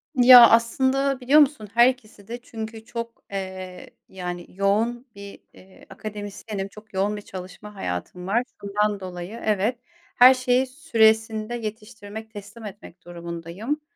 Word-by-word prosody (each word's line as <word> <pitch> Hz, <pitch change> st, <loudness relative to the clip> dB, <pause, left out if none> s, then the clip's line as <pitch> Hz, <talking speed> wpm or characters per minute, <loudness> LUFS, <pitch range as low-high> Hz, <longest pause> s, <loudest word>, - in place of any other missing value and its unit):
Ya, 245 Hz, -2 st, +9 dB
aslında, 260 Hz, +4 st, +2 dB
biliyor 270 Hz, +4 st, +5 dB
musun, 280 Hz, -7 st, +2 dB
her 235 Hz, +1 st, +6 dB
ikiside. 235 Hz, -2 st, -8 dB
Çünkü 220 Hz, -2 st, -8 dB
çok, 230 Hz, 0 st, -7 dB
eee, 185 Hz, -2 st, -7 dB, 0.2 s
yani, 180 Hz, -2 st, -6 dB
yoğun 220 Hz, +6 st, 0 dB
bir, 200 Hz, 0 st, -11 dB
eee, 190 Hz, 0 st, -18 dB
akademisyenim, 205 Hz, -1 st, -6 dB
çok 210 Hz, +2 st, -16 dB
yoğun 200 Hz, +2 st, 0 dB
bir -, -, -7 dB
çalışma 190 Hz, +2 st, -10 dB
hayatım 180 Hz, -, -5 dB
var. 230 Hz, +5 st, +1 dB, 0.2 s
Bundan 205 Hz, 0 st, -1 dB
dolayı, 185 Hz, +3 st, -8 dB
evet, 215 Hz, +3 st, +1 dB, 0.4 s
her 250 Hz, +2 st, +8 dB
şeyi 255 Hz, 0 st, +1 dB
süresinde 220 Hz, -4 st, +1 dB
yetiştirmek, 220 Hz, -1 st, -8 dB
teslim 205 Hz, +2 st, -10 dB
etmek 195 Hz, -4 st, -12 dB
durumundayım. 170 Hz, -, -5 dB
215 Hz, 130 wpm, -24 LUFS, 195-235 Hz, 0.4 s, Ya